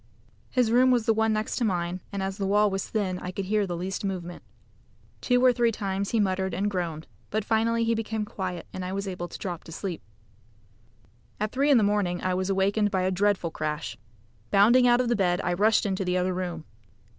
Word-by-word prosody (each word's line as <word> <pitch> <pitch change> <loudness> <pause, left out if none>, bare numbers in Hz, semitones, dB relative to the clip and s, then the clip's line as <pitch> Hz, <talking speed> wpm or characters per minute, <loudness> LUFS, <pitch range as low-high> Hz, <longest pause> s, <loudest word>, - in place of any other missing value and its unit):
His 245 -4 +2
room 250 +2 +5
was 245 -3 +2
the 225 - +4
one 220 0 +2
next 215 0 -1
to - - 0
mine, 180 -3 -1
and 200 -1 -3
as 195 +1 -4
the 195 - -1
wall 205 +1 +3
was 195 0 -2
thin, 190 -4 -1
I 180 - -6
could 190 +1 -4
hear 205 0 +1
the 175 -1 -3
least 185 +3 -4
movement. 180 -3 -4 0.8
Two 250 0 +3
or 250 - +6
three 240 -1 +2
times 200 -2 -3
he 230 - +1
muttered 190 -2 0
and 205 +2 0
groaned, 165 -4 -3 0.2
but 215 0 -2
finally 230 +1 +1
he 230 0 +2
became 220 -1 -2
quiet, 185 -4 -5
and 185 - -5
I 185 +1 -4
was 200 0 -3
able 180 -2 -4
to - - -9
drop 175 -4 -5
to - - -10
sleep. 175 0 -5 1.4
At 215 +1 -1
three 275 +3 +1
in 280 - +6
the 220 - +4
morning, 200 -4 +1
I 185 - +1
was 185 +1 -1
awakened 200 +2 +2
by 190 -2 0
a 185 - +1
dreadful 190 -2 +1
crash. 150 -10 -3 0.5
Bounding 235 +6 +5
out 240 +1 +5
of 240 -1 +1
bed 180 -3 +2
I - - 0
rushed 215 +5 +3
into 195 -1 -1
the 180 0 0
other 185 +1 0
room. 175 -3 -4
195 Hz, 220 wpm, -26 LUFS, 185-220 Hz, 1.4 s, or